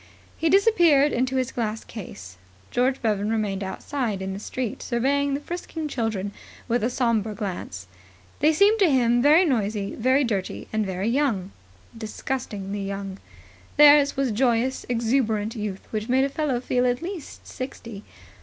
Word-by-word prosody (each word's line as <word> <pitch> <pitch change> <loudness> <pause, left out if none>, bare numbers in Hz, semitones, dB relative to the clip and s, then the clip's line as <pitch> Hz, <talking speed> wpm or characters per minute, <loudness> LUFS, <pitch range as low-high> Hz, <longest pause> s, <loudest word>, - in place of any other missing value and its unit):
He 325 - 0
disappeared 340 -8 +5
into 255 +2 0
his 260 0 0
glass 220 -2 -3
case. 95 - -10 0.3
George 255 +2 +1
Bevan 210 -2 0
remained 210 -3 -1
outside 220 +2 -3
in 190 0 -4
the 195 - -6
street 240 +1 -4
surveying 275 +3 0
the - - -2
frisking 325 0 -5
children 225 -7 -2 0.4
with 240 -1 0
a 235 - +2
sombre 230 -4 0
glance. 180 - -5 0.5
They 305 - +4
seemed 405 +7 +4
to 380 -4 +5
him 240 -3 +3
very 310 +7 +6
noisy, 210 -7 -1
very 260 +4 +2
dirty 205 -7 -3
and 215 -2 0
very 190 +2 -2
young. 230 -7 0 0.4
Disgustingly 215 -3 -4
young. 195 -1 -5 0.6
Theirs 290 -1 +7
was 270 -3 +1
joyous, 245 +2 +1
exuberant 225 -3 0
youth 210 -3 -5
which 215 +1 -3
made 260 +2 +3
a 275 - +1
fellow 280 -3 -1
feel 250 0 +1
at 245 +4 -1
least 355 -4 -7
sixty. 235 -5 -7
240 Hz, 155 wpm, -24 LUFS, 210-275 Hz, 0.6 s, Theirs